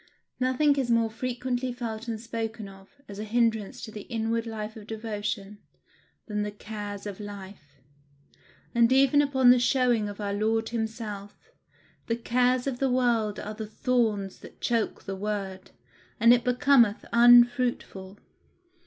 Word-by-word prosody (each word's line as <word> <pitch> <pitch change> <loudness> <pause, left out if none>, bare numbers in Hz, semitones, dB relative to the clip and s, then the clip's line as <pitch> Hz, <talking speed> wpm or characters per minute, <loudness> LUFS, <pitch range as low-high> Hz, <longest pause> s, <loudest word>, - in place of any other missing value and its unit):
Nothing 280 +3 +2
is 260 -3 -1
more 230 -1 +2
frequently 250 +1 -3
felt 230 -2 -6
and 225 -2 -3
spoken 225 -1 -5
of, 195 0 -15 0.2
as 200 0 -9
a - - -3
hinderance 225 -2 0
to 220 - -7
the 210 - -7
inward 230 0 -1
life 220 -1 -6
of 215 -2 -11
devotion, 210 -2 -5 0.7
than 210 -2 -3
the 210 - -2
"cares 205 -1 -7
of 205 -1 -6
life;" 195 -9 -10 0.9
and 235 0 +4
even 275 +2 +5
upon 265 -3 +4
the 250 - +5
showing 245 -4 +2
of 205 - -9
our 200 -1 -2
Lord 220 +2 0
himself, 220 -3 -6 0.6
the 230 - 0
cares 250 +2 +1
of 265 -3 -3
the 270 - +1
world 235 -4 +1
are 210 - -6
the 215 0 -6
thorns 215 -4 -1
that - - -14
choke 230 -2 -1
the 195 - -5
word, 195 -2 -4 0.5
and 230 +2 +7
it 240 -1 +2
becometh 250 -3 +3
unfruitful. 240 -5 +4
225 Hz, 150 wpm, -27 LUFS, 210-245 Hz, 0.9 s, and